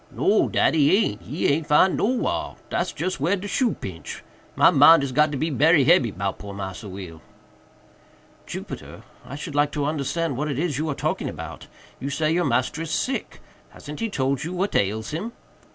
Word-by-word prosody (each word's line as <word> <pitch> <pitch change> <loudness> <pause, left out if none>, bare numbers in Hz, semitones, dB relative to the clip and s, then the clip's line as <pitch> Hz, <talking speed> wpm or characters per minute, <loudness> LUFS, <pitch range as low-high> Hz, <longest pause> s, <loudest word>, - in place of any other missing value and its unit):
"No, - - +2
dat - - +2
he 155 +4 +4
aint!—he 145 - -2
aint 150 +2 +1
'fin'd 180 +5 +4
nowhar—dat's 245 +4 -1
just 185 -5 -3
whar 170 +8 +2
de 200 +1 -6
shoe 225 +4 +1
pinch—my 90 - -1
mind 160 0 +7
is 135 - -2
got 150 +3 +3
to 145 - -3
be 160 +4 -1
berry 150 +2 +4
hebby 140 -4 +4
'bout 95 0 -4
poor 100 -1 -8
Massa 100 +1 -6
Will." 90 -4 -9 1.3
"Jupiter, - - -8 0.2
I 125 +2 -8
should 150 +1 -6
like 145 0 +2
to 145 -2 -1
understand 150 0 -1
what 150 +2 -2
it 140 - -2
is 150 -3 -1
you 155 +1 -1
are 140 - -2
talking - - -2
about. - - -8 0.3
You 135 - -4
say 155 +2 0
your 175 +1 +1
master 130 +4 0
is 165 - -4
sick. 255 +12 -2 0.3
Hasn't 150 0 -10
he 230 - -1
told 135 -5 -1
you 170 +3 -4
what 190 +3 -1
ails 105 +3 0
him?" 205 +10 -4
150 Hz, 185 wpm, -24 LUFS, 130-165 Hz, 1.3 s, mind